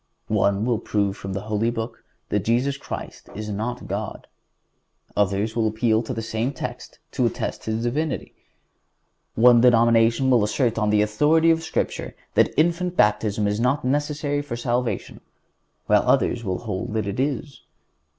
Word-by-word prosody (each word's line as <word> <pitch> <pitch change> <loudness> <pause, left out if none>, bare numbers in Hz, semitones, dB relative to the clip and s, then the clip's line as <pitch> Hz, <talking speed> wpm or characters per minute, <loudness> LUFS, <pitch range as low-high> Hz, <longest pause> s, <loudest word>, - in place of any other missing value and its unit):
One 100 0 +2
will 120 -3 +1
prove 100 -3 -1
from 95 -2 -6
the 100 - -3
Holy 110 +2 0
Book 115 0 -5 0.3
that 105 -2 0
Jesus 125 +5 +1
Christ 140 - -8
is 105 +1 -5
not 110 +4 -4
God. 100 +2 -4 0.9
Others 105 +2 0
will 115 -2 +2
appeal 110 0 +1
to 115 - -6
the 115 -3 -3
same 115 +4 -2
text 130 - -7
to - - +1
attest - - -4
His 110 +1 -2
Divinity. 145 +5 -2 1.0
One 120 +1 +6
denomination 115 +1 +4
will 120 -4 +4
assert 115 +2 0
on 105 -1 +1
the 105 0 +4
authority 150 +10 +3
of 165 0 +1
Scripture 160 - -3 0.2
that - - +3
infant 175 +3 +1
baptism 105 0 +2
is 105 +1 -1
not 125 +3 +1
necessary 145 +1 0
for 145 -5 -5
salvation, 120 0 -2 0.6
while - - +4
others 120 - +1
will 95 -3 -2
hold 105 -1 -4
that 110 -2 -1
it 100 +4 -4
is. 140 +1 -2
115 Hz, 160 wpm, -23 LUFS, 105-130 Hz, 1.0 s, One